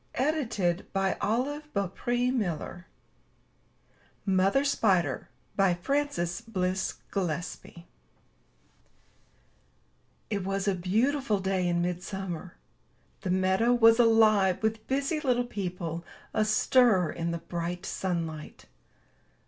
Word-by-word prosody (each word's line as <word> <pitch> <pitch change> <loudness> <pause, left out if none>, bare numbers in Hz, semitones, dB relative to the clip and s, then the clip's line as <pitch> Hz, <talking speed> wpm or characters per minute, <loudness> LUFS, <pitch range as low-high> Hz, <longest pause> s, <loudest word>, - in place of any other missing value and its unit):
227 230 - 0
MY 225 +9 0
BOOK 195 -2 -1
HOUSE 240 -9 -1 1.4
MOTHER 195 +7 +3
SPIDER* 185 - +1 0.5
Frances 275 -11 -1
Bliss 190 -4 -2 0.2
Gillespy 175 -2 -4 2.5
It 200 -3 -1
was 195 +1 -2
a 200 - +3
beautiful 220 +7 +1
day 190 -1 0
in 175 0 +1
midsummer. 180 0 -4 0.7
The 190 - -4
meadow 190 +6 +3
was 230 0 +6
alive 215 -5 +4
with 220 0 -1
busy 275 +4 0
little 250 -4 +1
people 180 -6 -4 0.3
astir 215 -3 +3
in 170 0 -3
the 170 - -1
bright 175 +2 -4
sunlight. 165 -4 -4
195 Hz, 90 wpm, -28 LUFS, 180-230 Hz, 2.5 s, was